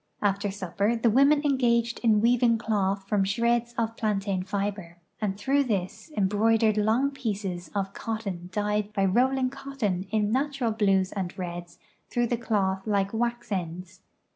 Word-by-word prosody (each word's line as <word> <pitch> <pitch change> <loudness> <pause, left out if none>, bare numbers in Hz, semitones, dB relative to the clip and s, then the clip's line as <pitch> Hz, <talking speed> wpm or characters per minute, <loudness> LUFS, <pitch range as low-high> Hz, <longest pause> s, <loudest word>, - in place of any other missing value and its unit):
After 200 0 +1
supi)er 200 +3 -1
the 230 -1 +3
women 280 +5 +4
engaged 235 -4 +2
in 220 -3 +3
weaving 235 0 +4
cloth 200 -3 -1
from 205 -1 +2
shreds 235 +4 0
of 230 -1 -1
i)lantain 200 -3 -1
fiber, 200 -3 -3 0.2
and 195 -2 -1
through 275 +7 +1
this 200 - -3
embroidered 215 +2 +3
long 225 +6 +2
pieces 200 - -4
of 195 -1 -2
cotton 200 -6 -5
dyed 210 +1 -1
by 195 -2 +1
rolling 255 +6 +2
cotton 245 -10 -3
in 210 0 +1
natural 265 -2 0
l)lues 195 -3 +2
and 185 -3 -4
reds 175 -1 -6 0.3
through 240 0 +1
the 240 - 0
cloth 195 -4 -1
like 200 -1 +1
wax 240 0 -2
ends. 180 0 -4
210 Hz, 150 wpm, -27 LUFS, 195-235 Hz, 0.3 s, women